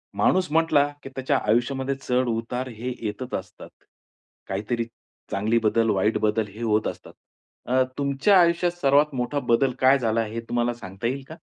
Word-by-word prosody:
माणूस 185 -3 +2
म्हंटला, 160 -3 +3 0.2
की - - -7
त्याच्या 135 +1 +1
आयुष्यामध्ये 130 +5 +1
चढ-उतार 125 -1 -1
हे 125 +3 -3
येतच 125 +5 -5
असतात. 95 -1 -13 0.8
काहीतरी 110 +4 -2 0.5
चांगले 105 +4 +1
बदल, 115 +1 +2
वाईट 105 +2 +2
बदल 110 0 +1
हे 105 +4 -11
होत 110 -1 +1
असतात. - - -8 0.5
अ, 130 +1 +3
तुमच्या 140 +8 +3
आयुष्यात 170 +1 +2
सर्वात 145 +2 +4
मोठा 125 +3 -1
बदल 130 +3 +3
काय 130 +1 +5
झाला 115 -2 +1
हे 110 +2 -5
तुम्हाला 120 0 0
सांगता 95 -1 -6
येईल 135 +3 -3
का? 160 - -9
125 Hz, 155 wpm, -24 LUFS, 110-140 Hz, 0.8 s, काय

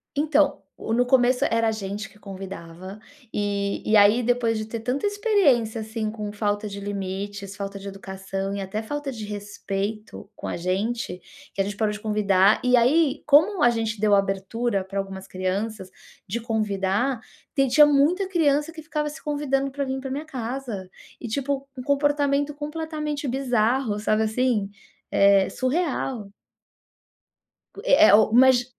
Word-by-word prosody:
Então, 295 -1 +2 0.2
no 235 +3 0
começo 250 0 +3
era 230 0 +1
a - - +1
gente 205 -1 -5
que 210 - -21
convidava 190 -1 -9 0.3
e 200 -1 -1
e 215 - +4
aí 210 +4 +6
depois 235 -2 +1
de 215 - -4
ter 225 +1 -5
tanta 250 - -1
experiência, 355 - +2
assim, 220 0 -3
com 210 -2 -5
falta 205 0 -1
de 200 0 -7
limites, 200 0 -5
falta 200 0 -6
de 200 - -9
educação 195 0 -5
e 200 - -3
até 195 +3 -4
falta 290 +4 -4
de 220 -4 -6
respeito 205 0 -5
com - - -7
a - - -3
gente, 185 +2 -2 0.3
que 195 - -1
a - - +3
gente 200 +1 -4
parou 215 0 0
de 210 - -6
convidar 205 -2 +3
e 250 0 +4
aí 285 +4 +3
como 310 +5 +4
a 240 - +6
gente 225 -2 -2
deu 210 0 +3
abertura 195 +2 0
para 195 +1 -4
algumas 195 -1 -6
crianças 190 +2 -3 0.4
de 225 +5 -2
convidar, 220 +2 -1 0.4
tem 275 -2 +3
tinha 295 +4 +7
muita 305 +7 +3
criança 300 -3 +2
que 320 -1 -10
ficava 300 -1 -2
se 300 - -11
convidando 275 -2 -1
para 280 +1 -3
vir 265 0 -3
pra 265 0 -6
minha 290 +4 -4
casa 245 -7 -5 0.3
e 240 - -6
tipo 275 +3 -2
um 255 - -6
comportamento 285 +1 +1
completamente 300 -1 -4
bizarro, 245 -3 0
sabe 215 +1 +1
assim? 220 -2 0 0.4
Eh, 200 -1 +5
surreal. 260 - -2 1.6
É 315 +3 +6
é - - +8
o 215 0 +4
o - - -6
mas 255 0 +6
225 Hz, 165 wpm, -24 LUFS, 200-275 Hz, 1.6 s, é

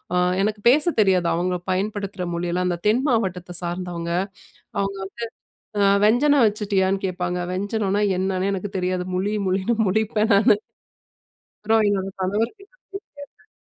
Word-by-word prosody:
அ - - +3 0.2
எனக்கு 210 +1 -1
பேச 290 +5 +4
தெரியாது. 185 -4 +3
அவுங்க 180 +2 0 0.2
பயன்படுத்துற 200 0 -2
மொழியெல்லாம் 175 +1 -1
அந்த 175 -1 -1
தென் 225 +4 +3
மாவட்டத்த 185 -8 -1
சார்ந்தவங்க. 175 -1 -4 0.7
அவுங்க 195 0 -2
வந்து 195 - -9 0.8
அ - - +5
வெஞ்சனம் 265 +5 +4
வச்சிட்டியான்னு 200 -2 0
கேட்பாங்க. 180 -1 -2
வெஞ்சனோன்னா 200 +1 -1 0.2
என்னன்னே 190 +1 0
எனக்கு 195 +1 -4
தெரியாது. 180 0 -1
முழி, 200 +3 -1
முழினு 190 +5 +1
முழிப்பேன் 220 +2 +1
நானு. 200 +1 +5 1.1
அப்புறம் 220 +1 +3
என்னோட 195 -1 -1
கணவருக்கிட்ட 225 - -2
போய் - - -33 0.5
கேட்பேன். - - -28
195 Hz, 130 wpm, -23 LUFS, 185-215 Hz, 1.1 s, அ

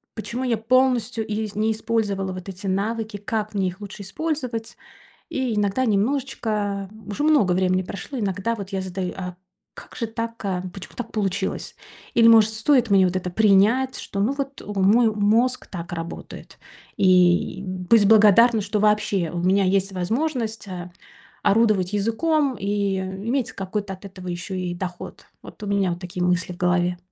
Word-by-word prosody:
почему 235 +3 -4
я 235 -3 +1
полностью 245 -1 +2
изь 215 -1 -3
не 220 +1 +1
использовала 205 -4 -1
вот 185 +1 -8
эти 195 +1 -7
навыки? 215 +2 -2
Как 215 +1 -3
мне 190 -2 +1
их 185 +4 -11
лучше 205 0 -8
использовать? 255 -3 -4 0.5
И 255 -4 -1
иногда 210 +5 +1
немножечко, 210 -3 -1 0.2
уже 235 +8 -3
много 280 -13 +4
времени 185 0 +2
прошло, 245 +8 -7
иногда 200 +2 -1
вот 200 -1 -7
я 195 -1 -2
задаю: 185 0 -4
"А 180 -1 -6 0.4
как - - -13
же 230 - -2
так, 230 0 -5
а, 185 -2 -1
почему 190 -1 -10
так 245 -2 -6
получилось?" 200 -2 -2 0.4
Или 230 -1 +6
может 220 -1 +7
стоит 235 +1 +2
мне 190 -2 +5
вот 180 - -1
это 180 -1 -3
принять, 220 +6 +3
что 200 - -6
ну 230 +7 +2
вот, 275 -1 -5
э, - - -13
мой 210 +3 +3
мозг 225 +5 +2
так 175 -1 -7
работает? 165 0 -8 0.4
И, 180 0 +3
м, 185 -1 -5
быть 210 +1 +5
благодарна, 220 +1 +6
что 205 +1 -1
вообще 210 -5 +2
у 175 - -3
меня 190 +3 +3
есть 195 +1 +1
возможность, 225 - -2
а, 180 -1 -6 0.5
орудовать 205 -3 +3
языком 270 +6 +1
и 200 -1 0
иметь 200 +7 -2
какой-то 195 +1 -4
от 185 - -16
этого 185 -1 -10
ещё 175 +2 -5
и 180 -1 -3
доход. 180 -1 -7 0.2
Вот - - -13
у - - -4
меня 200 -2 +1
вот 170 - -6
такие 180 0 -4
мысли 180 0 0
в - - -10
голове. 180 0 +1
205 Hz, 170 wpm, -23 LUFS, 185-230 Hz, 0.5 s, может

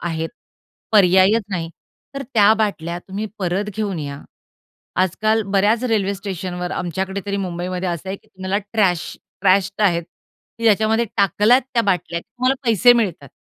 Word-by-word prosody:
आहेत. 165 -1 -3 0.6
पर्यायच 195 +2 +5
नाही, 170 -3 -3 0.4
तर 275 - -4
त्या 210 -1 +6
बाटल्या 175 -6 -2
तुम्ही 200 +4 -5
परत 195 +2 -1
घेऊन 205 -5 -2
या. 140 -1 -6 0.8
आजकाल 215 +4 +1
बऱ्याच 210 +5 +2
रेल्वे 205 -4 +1
स्टेशनवर 180 -2 -5
आमच्याकडे 190 +3 -3
तरी 200 0 -1
मुंबईमध्ये 180 0 -3
असं 170 +1 -4
आहे, 195 - -3
की - - -27
तुम्हाला 190 +2 -3
ट्रॅश 185 -6 +1 0.2
ट्रॅश्ड 195 +1 +2
आहेत, 170 -4 +3 0.6
की 230 - -6
ज्याच्यामध्ये 220 +1 +3
टाकल्यात 210 +6 +4
त्या 230 - +3
बाटल्या 180 -4 -1
तुम्हाला 255 +6 -1
पैसे 230 +2 +6
मिळतात. 195 - -1
195 Hz, 145 wpm, -20 LUFS, 180-215 Hz, 0.8 s, त्या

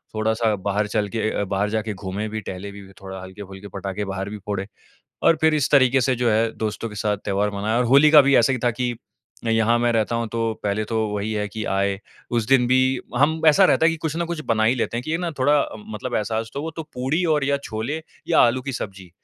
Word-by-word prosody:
थोड़ा-सा 110 0 +1
बाहर 100 +2 -1
चल 105 -1 -1
के 115 - -3
अ - - -2
अ, - - +1
बाहर 100 +1 -1
जाके 110 0 -2
घूमे 100 +2 -4
भी 110 +1 -4
टहले 95 +1 -7
भी 100 0 -11 0.2
थोड़ा 95 -1 -7
हल्के-फुल्के 95 +1 -10
पटाखे 100 +1 -4
बाहर 95 0 -4
भी 105 - -6
फोड़े 100 -2 -3 0.6
और 165 - +5
फ़िर 160 0 +4
इस 145 -3 +1
तरीक़े 135 -2 +5
से 130 +1 +2
जो 120 -1 +1
है 110 +1 +2
दोस्तों 110 +1 -3
के 105 - -10
साथ 105 0 -1
त्योहार 100 +1 0
मनाया 105 +3 -1
और 125 - +2
होली 140 +5 +6
का 150 - +9
भी 140 0 +3
ऐसा 120 +3 +4
ही 125 - -1
था 120 - +4
की 120 +1 -2 0.5
यहाँ 115 +1 +3
मैं 120 0 +2
रहता 115 0 0
हूँ 115 -1 -2
तो 115 -1 0
पहले 105 +1 -1
तो 110 0 -1
वही 105 +1 -3
है 105 -1 -1
कि 110 +1 -5
आए। 100 0 0 0.3
उस 115 -2 0
दिन 130 -2 +4
भी 130 +1 +2 0.2
हम 155 +4 +2
ऐसा 155 +6 +7
रहता 160 -3 +4
है - - +5
कि 165 - -3
कुछ 160 0 -4
ना 170 - 0
कुछ 170 -1 -4
बना 110 -1 +2
ही 120 +4 +4
लेते 120 -1 -2
हैं 120 - -2
कि 155 - -4
ये 165 - 0
ना 175 -1 -2
थोड़ा 145 +3 +4
अम, 110 - -5
मतलब 120 +3 -5
एहसास 110 +1 -2
तो 140 - -3
वो 160 - -4
तो 165 - -3
पूड़ी 135 +8 0
और 145 - 0
या 140 0 +2
छोले 115 +8 -3 0.3
या - - +4
आलू 125 +2 +3
की 135 - -4
सब्जी। 95 -5 -7
110 Hz, 255 wpm, -22 LUFS, 105-130 Hz, 0.6 s, का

